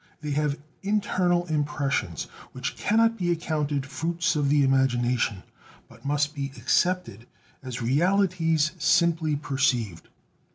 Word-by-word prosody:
They 150 -1 -4
have 145 0 0 0.2
internal 185 -4 +1
impressions 145 - -1 0.3
which 130 +1 -4
cannot 225 +1 +2
be 175 -1 0
accounted 150 -4 -1
fruits 165 +5 -1
of 145 -2 +1
the 145 0 +4
imagination, 125 -6 +1 0.4
but - - -18
must 145 +1 0
be 140 -2 -4
accepted 130 - 0 0.3
as 125 -3 -5
realities 165 +2 +2
simply 160 0 +2
perceived. 130 - -1
150 Hz, 115 wpm, -26 LUFS, 135-170 Hz, 0.4 s, the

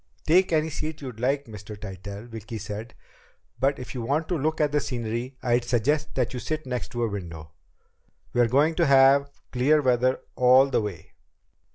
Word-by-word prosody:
"Take 180 +4 +4
any 160 0 +1
seat 155 +1 -5
you 135 -3 -5
like, 135 +5 -1
Mr. 105 -2 -9
Tytell," 100 +2 -8
Vicki 115 -1 -7
said. 110 +2 -7 0.6
"But 135 +1 +2
if 125 - -8
you 125 - -4
want 145 +7 -1
to 180 - +1
look 155 +1 -1
at 150 -2 +2
the 150 - +2
scenery, 120 0 -4
I'd 120 -1 +2
suggest 130 +6 0
that 125 -2 0
you 125 - -3
sit 155 +3 -4
next 125 -1 -3
to 120 0 -1
a - - +2
window. 85 -7 -7 0.8
We're 120 -1 +4
going 145 +7 +3
to 170 -3 +3
have 140 +1 +5 0.2
clear 135 +5 +3
weather 130 -1 +2
all 130 +2 +5
the - - +2
way." 100 -6 -7
125 Hz, 185 wpm, -25 LUFS, 115-145 Hz, 0.8 s, have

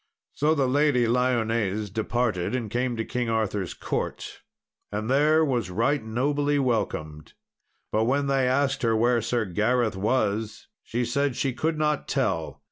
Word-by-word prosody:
So 155 +2 +2
the 135 -3 +1
Lady 140 -2 +3
Lyones 115 -4 0
departed 110 -2 -1
and 115 -5 -3
came 125 0 -1
to 115 - -2
King 125 -2 -2
Arthur's 105 -5 -1
court, - - -4 0.5
and 110 +3 -2
there 155 +3 +4
was 120 -9 -1
right 115 +8 0
nobly 145 +6 0
welcomed. 80 - -2 0.6
And 110 +1 +2
when 140 +3 +1
they 135 -2 +2
asked 135 +1 +1
her 115 -2 +2
where 120 +1 +3
Sir 115 0 0
Gareth 110 +4 +1
was, 105 +1 -1 0.2
she 120 +1 -2
said 140 +2 0
she 135 0 -1
could 160 +5 -1
not 150 -1 0
tell. 95 - -1
120 Hz, 150 wpm, -26 LUFS, 110-135 Hz, 0.6 s, there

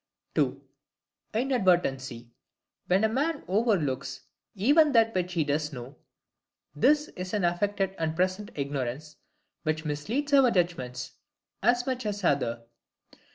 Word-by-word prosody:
(ii) - - +1 0.8
INADVERTENCY: 175 - +1 0.6
When 190 +3 +3
a - - +5
man 285 +7 -1
overlooks 155 - 0 0.3
even 290 - +4
that 225 -1 +4
which 180 -1 -1
he 165 -2 +2
does 150 +1 -1
know. 130 +1 -8 0.8
This 295 - +3
is 185 +2 -5
an 205 - 0
affected 195 +2 0
and 160 -1 -1
present 185 +4 0
ignorance, 140 +1 -4 0.4
which 155 0 -2
misleads 225 - -2
our 270 -3 +7
judgments 165 - -1 0.5
as 245 0 +3
much 255 -3 -2
as 205 -1 -3
the 180 - +4
other. 120 -4 -1
180 Hz, 125 wpm, -28 LUFS, 145-225 Hz, 0.8 s, our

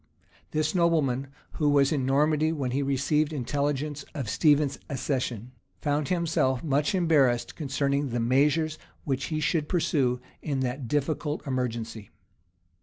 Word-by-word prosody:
This 155 0 0
nobleman, 155 -7 +2 0.3
who 150 -2 +3
was 140 -1 +4
in 135 -5 0
Normandy 150 +3 +2
when 140 -6 -2
he 135 +3 0
received 140 +3 +1
intelligence 145 +1 -2
of 130 -7 -3
Stephen's 145 -3 +3
accession, 125 -4 -2 0.3
found 145 -1 0
himself 160 -7 +1
much 150 +3 +1
embarrassed 145 -9 +2
concerning 140 -1 -1
the 120 0 -2
measures 150 +6 +2 0.2
which 135 -1 -1
he 155 -2 -2
should 155 -1 0
pursue 135 -8 +1 0.2
in 140 -3 -2
that 130 0 -3
difficult 150 +3 -1
emergency. 120 -5 -3
140 Hz, 130 wpm, -27 LUFS, 130-155 Hz, 0.3 s, was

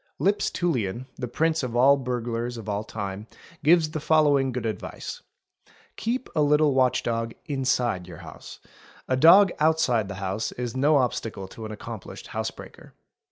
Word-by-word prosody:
Lipps 200 +2 +1
Tullian, 125 - -2
the 125 - -4
prince 160 +6 0
of 125 -3 -4
all 135 +3 +6
burglars 120 -2 -3
of 110 -2 -9
all 105 0 -2
time, 100 -1 -6 0.4
gives 160 0 +4
the 155 - -3
following 145 -3 +3
good 125 -2 -4
advice:— 110 - -5 0.2
— - - -33
" - - -31
Keep 245 +3 -2
a 155 - +3
little 150 0 +4
watch 130 -1 +2
dog 115 0 -2
wside 125 -9 0
your 90 - -10
house; - - -11 0.5
a 130 - +1
dog 175 +8 +7
outside 150 -9 +2
the 100 - -6
house 95 +3 -3
is 120 -1 -5
no 145 +3 +4
obstacle 115 -6 -2
to 110 +2 -8
an - - -8
accomplished 110 -1 -8
house - - -1
breaker''. - - -13
125 Hz, 170 wpm, -25 LUFS, 110-150 Hz, 0.5 s, dog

